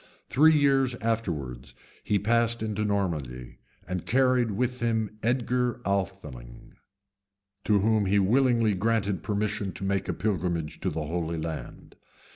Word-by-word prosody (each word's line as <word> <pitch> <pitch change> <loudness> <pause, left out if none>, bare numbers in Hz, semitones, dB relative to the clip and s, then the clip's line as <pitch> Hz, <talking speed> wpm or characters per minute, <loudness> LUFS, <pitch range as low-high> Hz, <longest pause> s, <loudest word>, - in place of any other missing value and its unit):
Three 155 +4 +6
years 135 -3 +3
afterwards 85 - -3 0.3
he 105 - +1
passed 115 +2 +1
into 105 -1 -2
Normandy, 80 - -2 0.3
and 90 -1 -3
carried 130 -2 +2
with 125 +4 -1
him 110 -2 -1
Edgar 125 +1 0
Atheling, 95 -12 -4 0.9
to 105 -2 +3
whom 110 -1 +2
he 100 +2 +3
willingly 115 +1 +3
granted 100 -2 0
permission 105 -1 -2
to 95 - -6
make 95 0 -1
a - - +1
pilgrimage 85 -6 -2
to 95 - -1
the 80 -2 -3
Holy 85 +1 -2
Land. 80 0 -7
105 Hz, 130 wpm, -27 LUFS, 90-115 Hz, 0.9 s, Three